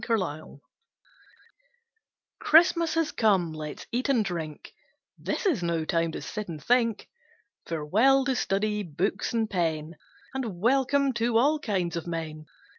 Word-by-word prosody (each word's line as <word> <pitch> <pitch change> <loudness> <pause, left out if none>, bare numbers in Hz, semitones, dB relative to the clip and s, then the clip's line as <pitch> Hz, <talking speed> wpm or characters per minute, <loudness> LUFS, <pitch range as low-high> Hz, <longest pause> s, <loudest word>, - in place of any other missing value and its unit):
CHRISTMAS 175 - -2 1.8
Christmas 335 0 +4
has 330 -2 +1
come, 190 -7 +2
let's 155 -1 -7
eat 250 +4 -1
and 240 -6 +3
drink 160 -5 -6 0.5
This - - -3
is 310 - +2
no 170 -2 -1
time 165 0 0
to - - -6
sit 210 -1 -5
and 160 -2 -6
think; 235 -2 +1 0.6
Farewell 215 - +3
to 265 -1 +1
study, 210 -1 0
books 190 +3 -2
and 225 -2 0
pen, 165 -5 -2 0.4
And 235 -9 -4
welcome 270 +4 +2
to 230 0 +2
all 295 +6 +3
kinds 185 - -2
of 170 - -5
men. 155 -2 -5
210 Hz, 135 wpm, -27 LUFS, 165-255 Hz, 1.8 s, Christmas